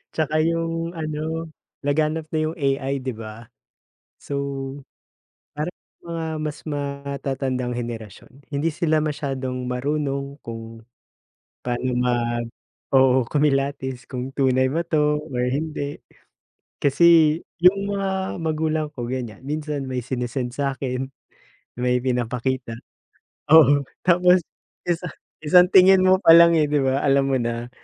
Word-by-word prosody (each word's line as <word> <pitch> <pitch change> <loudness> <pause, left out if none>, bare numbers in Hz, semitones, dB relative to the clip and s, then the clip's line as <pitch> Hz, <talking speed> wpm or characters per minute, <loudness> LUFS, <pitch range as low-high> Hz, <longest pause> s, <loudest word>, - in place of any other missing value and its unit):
Tsaka 155 0 0
yung 165 +1 -1
ano, 160 +1 -4 0.3
laganap 155 +2 0
na 155 - 0
yung 160 - -5
AI, 135 -2 -1
'di 130 - -2
ba. 115 +1 -10 0.7
So, 140 - -7 1.2
parang 150 +4 -3 0.3
mga 165 -1 -4 0.2
mas 150 -1 -4
matatandang 140 -3 -3
henerasyon, 120 +2 -7
hindi 145 +3 0
sila 160 -1 +1
masyadong 135 -4 -3
marunong 140 +2 -2
kung 115 0 -8 0.8
paano 125 0 -1
mag 120 -1 0 0.5
oo, 130 -1 +5
kumilatis 135 -3 0
kung 125 0 -5
tunay 130 -1 +3
ba 165 +5 -1
'to 150 -2 +1
or 125 0 0
hindi. 145 +1 -3 0.8
Kasi 160 +2 +5 0.2
yung 200 +3 +3
mga 190 -1 -2
magulang 155 -1 -1
ko 120 -1 -5
ganiyan. 120 -5 -5
Minsan 150 -1 -4
may 125 -2 -3
sinisend 125 -1 -3
sa'kin, 135 -1 -2 0.7
may 125 0 +1
pinapakita. 125 -1 -2 0.8
Oo, 145 -3 +7 0.2
tapos 180 0 +4 0.5
isa 175 +1 0 0.4
isang 180 +4 +6
tingin 190 0 +7
mo 185 0 +5
palang 170 -2 +7
eh, 155 - +4
'di 145 -1 +1
ba 135 0 +1
alam 135 0 +3
mo 135 - +2
na, 120 0 -3
140 Hz, 120 wpm, -23 LUFS, 125-160 Hz, 1.2 s, Oo